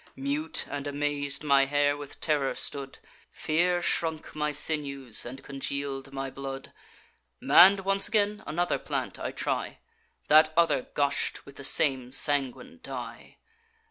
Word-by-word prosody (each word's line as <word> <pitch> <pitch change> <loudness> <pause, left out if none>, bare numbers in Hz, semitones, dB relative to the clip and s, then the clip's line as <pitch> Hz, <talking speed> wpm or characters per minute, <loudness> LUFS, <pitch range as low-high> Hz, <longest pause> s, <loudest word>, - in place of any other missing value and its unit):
Mute 295 +4 -1
and 145 0 -5
amaz'd, 145 0 -2
my 140 -2 +4
hair 145 +1 +1
with 145 -1 -9
terror 145 -5 0
stood; 140 -2 -3 0.3
Fear 175 +3 0
shrunk 160 -2 -1
my 150 0 -1
sinews, 140 -6 -1
and 130 +3 -9
congeal'd 140 0 -4
my 135 -1 -5
blood. 135 0 -7 0.7
Mann'd 195 +2 +7
once 195 +1 +2
again, 210 -1 0
another 175 +3 -1
plant - - -4
I - - -3
try: - - -3 0.5
That 155 +1 +6
other 170 -6 +2
gush'd 140 -1 -1
with 140 - -15
the 140 - -9
same 130 -3 +3
sanguine 145 - 0
dye. - - -8
145 Hz, 135 wpm, -27 LUFS, 135-170 Hz, 0.7 s, Mann'd